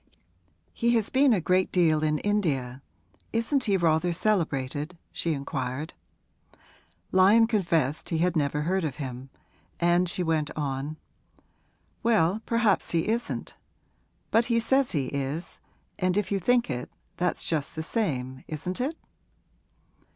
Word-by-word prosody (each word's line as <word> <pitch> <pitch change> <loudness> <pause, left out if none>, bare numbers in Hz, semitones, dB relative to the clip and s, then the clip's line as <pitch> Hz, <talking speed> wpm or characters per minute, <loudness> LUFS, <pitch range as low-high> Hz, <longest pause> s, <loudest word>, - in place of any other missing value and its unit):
'He 235 +1 +2
has 225 -3 0
been 270 0 +4
a 215 - +3
great 185 +2 +1
deal 160 -4 +3
in 150 0 +2
India 145 -11 -1 0.5
isn't 250 +4 0
he 200 -3 +3
rather 170 0 +2
celebrated?' 160 -4 -1
she 165 - -1
inquired. 140 +2 -4 1.2
Lyon 200 +5 +6
confessed 170 - 0
he 165 - 0
had 180 +2 +1
never 150 -1 0
heard 185 +3 0
of 145 -5 -2
him, 130 -2 -6 0.5
and 175 +1 +3
she 180 - -1
went 160 -3 0
on, 145 +1 -3 1.0
'Well, 215 -3 +2
perhaps 230 -6 +2
he 165 +4 0
isn't; 235 +2 -2 0.8
but 225 +1 +4
he 235 -1 +2
says 265 +3 +2
he 140 -5 0
is, 140 +5 -4 0.4
and 185 +1 +1
if 205 -2 -1
you 200 - +1
think 245 +5 +2
it, 125 -3 -4 0.3
that's 180 0 0
just 155 -4 -1
the 160 - -3
same, 130 - -2
isn't 180 +7 -4
it?' 300 +6 -2
170 Hz, 135 wpm, -27 LUFS, 150-210 Hz, 1.2 s, Lyon